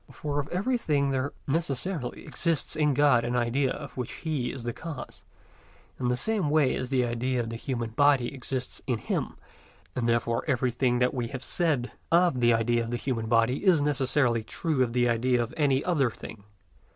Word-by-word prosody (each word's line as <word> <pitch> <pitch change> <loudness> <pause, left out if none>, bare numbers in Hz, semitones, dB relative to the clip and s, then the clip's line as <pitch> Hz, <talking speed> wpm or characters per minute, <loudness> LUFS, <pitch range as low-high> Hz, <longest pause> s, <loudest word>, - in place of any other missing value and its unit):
For 145 -1 -3
of 140 - -3
everything 175 - 0
there 135 +1 -1
necessarily 145 -1 -2
exists 165 -3 0
in 150 -3 +2
God 140 -4 +4
an 120 +1 -1
idea 125 +3 +1
of 145 - -7
which 125 -2 -4
He 150 -7 -2
is 130 -3 -7
the 120 0 -3
cause, 160 0 -8 0.8
in 125 - -1
the 125 - +2
same 200 - 0
way 150 -3 +3
as 125 - -3
the 130 -2 +2
idea 120 +2 -1
of 115 -1 -3
the - - -5
human 115 -1 -3
body 140 0 +3
exists 130 -1 -4
in 125 -3 +1
Him; - - -3 0.6
and 120 -2 0
therefore 115 0 +1
everything 125 -2 +1
that 125 0 +2
we 120 -3 -2
have 130 +2 -7
said 150 -8 0 0.2
of 170 -5 +4
the 120 -1 +4
idea 115 +1 +2
of 115 - -6
the 120 - -1
human 120 -3 -2
body 115 - +2
is 185 -5 +5
necessarily 135 -4 +1
true 155 +3 -1
of 120 -2 +1
the 120 0 +3
idea 120 +1 +2
of 115 - -7
any 140 -4 +2
other 150 -8 +2
thing. 105 -2 -10
130 Hz, 190 wpm, -27 LUFS, 120-145 Hz, 0.8 s, is